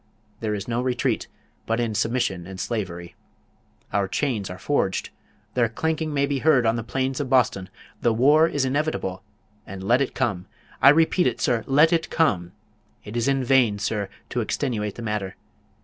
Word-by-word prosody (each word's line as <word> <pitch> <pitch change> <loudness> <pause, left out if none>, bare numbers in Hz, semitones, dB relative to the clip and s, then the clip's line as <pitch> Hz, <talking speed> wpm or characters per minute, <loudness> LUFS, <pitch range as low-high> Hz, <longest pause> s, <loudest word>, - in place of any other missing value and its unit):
There 105 -2 -2
is 100 -1 -6
no 120 0 -1
retreat, 125 -1 -1 0.4
but 115 +1 0
in 115 -2 -1
submission 105 -6 -1
and 95 -1 -8
slavery. 90 -7 -4 0.8
Our 100 -1 +1
chains 110 -1 -1
are 90 - -7
forged. 95 -2 -1 0.4
Their 120 -3 +2
clanking 160 +5 -2
may 140 -1 +1
be 140 -1 -1
heard 135 -4 +4
on 115 0 +3
the 115 - -2
plains 130 +2 -2
of 140 -3 -3
Boston. 115 -8 +2 0.3
The 120 - +3
war 145 +8 +5
is 145 -4 0
inevitable; 130 -9 -1 0.5
and 95 0 -7
let 120 +7 +3
it 135 - -2
come! 100 -9 -1 0.3
I 135 - +9
repeat 165 +4 +4
it, - - -2
sir, 115 -3 +1
let 150 +5 +5
it 165 -1 0
come! 95 - +1 0.5
It 105 +2 -8
is 120 +1 0
in 135 -1 +1
vain, 125 -5 +3
sir, 100 -1 -2 0.2
to 120 - 0
extenuate 110 -3 -2
the 120 - -7
matter. 105 -3 -3
120 Hz, 180 wpm, -24 LUFS, 100-140 Hz, 0.8 s, I